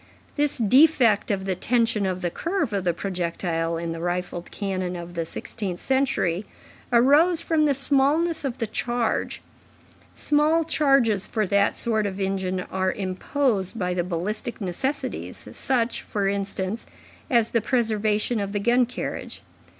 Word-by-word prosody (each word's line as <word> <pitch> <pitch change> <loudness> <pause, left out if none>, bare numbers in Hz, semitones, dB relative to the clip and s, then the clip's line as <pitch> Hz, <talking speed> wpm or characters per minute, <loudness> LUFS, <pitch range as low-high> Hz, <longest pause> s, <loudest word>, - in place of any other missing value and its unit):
This 295 -1 +1
defect 245 -2 +4
of 195 -2 -1
the 190 - 0
tension 225 0 +1
of 185 -1 -3
the 175 - 0
curve 340 - -2
of 195 -2 -1
the 175 - +3
projectile 170 -2 -2
in 165 0 -3
the 165 - -5
rifled 175 0 -3
cannon 185 -3 -3
of 175 0 -7
the 165 -1 -2
sixteenth 190 -3 -5
century 230 -9 0 0.4
arose 290 +8 +5
from 315 -2 +2
the 285 -2 +2
smallness 285 +5 +2
of 265 -3 -3
the 230 - -1
charge; 240 +1 -2 0.7
small 305 +3 +3
charges 275 - +2
for 215 -1 0
that 200 +1 +2
sort 220 -3 0
of 195 0 -5
engine 190 -1 -1
are 190 0 -1
imposed 200 +2 -1
by 180 -2 -1
the 175 -1 0
ballistic 185 +7 -3
necessities, 260 - -3
such, 245 -4 0
for 200 -2 -2
instance, 195 +1 -2 0.4
as 235 -5 +3
the 230 - +2
preservation 220 -1 +1
of 200 0 -3
the 205 - 0
gun 240 +3 +3
carriage. 250 - -6
210 Hz, 150 wpm, -24 LUFS, 185-260 Hz, 0.7 s, arose